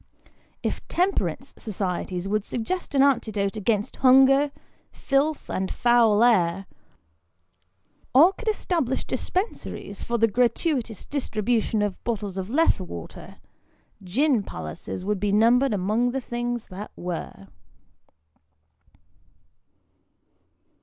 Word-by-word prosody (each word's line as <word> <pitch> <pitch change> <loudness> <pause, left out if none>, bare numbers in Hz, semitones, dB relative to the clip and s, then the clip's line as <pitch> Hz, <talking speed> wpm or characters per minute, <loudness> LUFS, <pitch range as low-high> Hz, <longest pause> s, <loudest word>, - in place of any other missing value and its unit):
If - - -3
Temperance 370 +3 -1
Societies 185 -3 -3
would 210 +1 0
suggest 285 - -4
an 270 - +5
antidote 215 -7 +1
against 210 0 -1
hunger, 270 +2 +5 0.4
filth, 290 +2 0
and 190 0 -2
foul 235 -3 +4
air, 195 -5 +3 1.5
or 320 +9 +6
could 455 +4 -11
establish 335 - 0
dispensaries 365 - -4
for 235 - -1
the 230 0 +4
gratuitous 240 - 0
distribution 225 -5 -1
of 205 -3 -4
bottles 210 -5 -3
of 190 +1 -5
Lethe 315 -1 +3
water, 85 - -9 0.7
gin 250 - +2
palaces 80 - -7
would 210 -1 -1
be 205 0 0
numbered 235 +6 +4
among 210 +5 +1
the 265 +2 -2
things 240 -1 -3
that 200 +2 -7
were. 175 - -6
230 Hz, 105 wpm, -25 LUFS, 200-270 Hz, 1.5 s, or